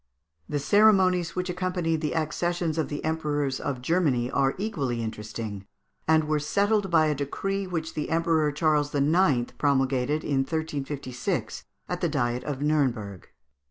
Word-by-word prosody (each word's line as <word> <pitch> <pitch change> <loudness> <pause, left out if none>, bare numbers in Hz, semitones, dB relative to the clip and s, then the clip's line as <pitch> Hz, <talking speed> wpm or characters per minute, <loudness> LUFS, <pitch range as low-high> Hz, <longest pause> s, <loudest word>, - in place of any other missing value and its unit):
] 80 0 -42
The 145 - -1
ceremonies 185 0 +4
which 180 0 -1
accompanied 180 -3 -1
the 150 - -2
accessions 165 +1 -1
of 160 - -1
the 145 0 -4
emperors 145 -4 -1
of 130 -3 -4
Germany 135 -7 +1
(Fig. - - -10
388) - - +2
are 135 0 +2
equally 130 - -2
interesting, 110 -2 -6 0.4
and 160 0 +4
were 155 0 0
settled 200 +6 +1
by 160 -2 +4
a 155 - +2
decree 195 +8 -3
which 165 -3 -3
the 150 - -3
Emperor 160 -2 +2
Charles 150 -1 +1
IX. 145 -3 +2
promulgated 135 +1 +1
in 140 -2 0
1356, 140 -3 -3 0.2
at 180 0 -4
the 170 - +1
Diet 125 -4 -1
of 145 -1 -3
Nuremberg. 125 - 0
150 Hz, 160 wpm, -26 LUFS, 135-165 Hz, 0.4 s, ceremonies